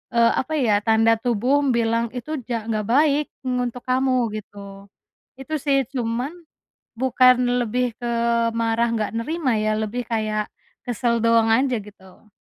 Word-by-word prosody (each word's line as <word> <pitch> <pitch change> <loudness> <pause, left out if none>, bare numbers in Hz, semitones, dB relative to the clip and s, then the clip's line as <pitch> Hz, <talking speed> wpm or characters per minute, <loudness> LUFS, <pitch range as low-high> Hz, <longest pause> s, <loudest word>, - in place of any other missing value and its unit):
eee, 230 0 +5
apa 305 +4 -3
ya 220 -8 +2
tanda 225 +1 +3
tubuh 245 +4 +1 0.2
bilang 230 0 +1
itu 305 +5 -4
ja 235 -3 -2
"Nggak 215 -1 -3
baik 290 +3 +3 0.2
ng 250 -1 -1
untuk 245 +1 -8
kamu." 255 -3 +1
Gitu, 200 -1 -12 0.5
itu 270 +4 -9
sih 275 -1 +1
cuman, 245 +2 -2 0.7
bukan 255 0 +5 0.3
lebih 245 0 -1
ke 240 -1 -3 0.4
marah 230 0 0
nggak 215 -2 -1
nerima 300 -4 -1
ya 215 0 0
lebih 225 +3 -3
kayak, 215 -1 -1 0.3
kesel 235 -1 -1
doang 230 -1 +4
aja 245 +1 +2
gitu. 200 0 -16
235 Hz, 145 wpm, -22 LUFS, 220-255 Hz, 0.7 s, eee